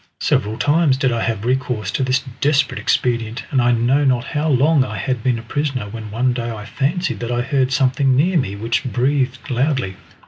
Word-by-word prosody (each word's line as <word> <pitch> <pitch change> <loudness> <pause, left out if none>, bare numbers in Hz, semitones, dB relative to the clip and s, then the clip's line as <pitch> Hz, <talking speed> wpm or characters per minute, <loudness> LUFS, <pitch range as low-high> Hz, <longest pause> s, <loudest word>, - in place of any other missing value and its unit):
Several 105 +2 0
times 145 -1 +2
did 135 -2 +1
I 115 -1 -1
have 115 -2 -2
recourse 125 -5 -1
to - - -2
this 130 +1 +1 0.2
desperate 145 0 +2
expedient, 115 -1 0
and 130 - +2
I 120 0 +3
know 120 +5 +2
not 125 -3 +2
how 155 0 -1
long 145 +1 +4
I 110 -4 -5
had 125 +5 -2
been 125 0 +1
a 115 - -8
prisoner 135 -3 -2
when 110 0 -7
one 125 +4 0
day 120 -1 -3
I 110 -2 -6
fancied 150 - -1
that 120 - -4
I 120 0 0
heard 130 0 0
something 130 0 +2
near 175 +8 +2
me, 115 - 0
which 115 +5 -1
breathed 130 +2 -1
loudly. 125 -7 0
130 Hz, 205 wpm, -19 LUFS, 115-140 Hz, 0.2 s, long